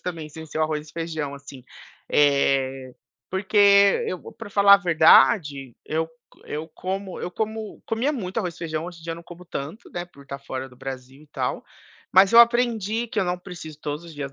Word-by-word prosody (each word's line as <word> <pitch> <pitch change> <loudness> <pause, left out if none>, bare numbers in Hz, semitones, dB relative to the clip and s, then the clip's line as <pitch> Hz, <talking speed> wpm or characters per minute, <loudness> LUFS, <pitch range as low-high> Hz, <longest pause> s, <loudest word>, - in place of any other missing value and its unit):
também 165 -4 -5
sem 160 +1 -10
ser 155 - -6
o - - +2
arroz 155 0 -3
e - - -15
feijão, 160 -4 -4
assim, 140 -2 -11 0.5
eh, 135 -2 +2 0.4
porque 200 +1 +4
eu 185 - -6
para 225 -2 -10
falar 200 0 +7
a - - +7
verdade, 150 - +4
eu 160 +1 -1
c 160 0 -27
eu 155 +2 -5
como 190 0 -5
eu 180 - -4
como 220 +1 -4
comia 240 +7 0
muito 195 -6 -4
arroz 180 -6 -3
e - - -16
feijão, 160 -1 -4
hoje 175 -1 -8
em 160 - -15
dia, 165 -1 -3
não 170 - -11
como 175 +1 -12
tanto, 155 +7 -7
né, 175 0 -4
por 140 -5 -17
estar 140 0 -7
fora 130 -1 -6
do 125 - -18
Brasil 135 +1 -8
e 155 - -20
tal, 130 -3 -3 0.5
mas 190 +3 +6
eu 235 - +10
aprendi 235 -2 +2
que 220 -2 -2
eu - - +1
não 180 0 -2
preciso 170 -5 -10
todos 150 +2 -4
os 165 - -11
dias 140 -2 -6
165 Hz, 210 wpm, -24 LUFS, 145-195 Hz, 0.5 s, eu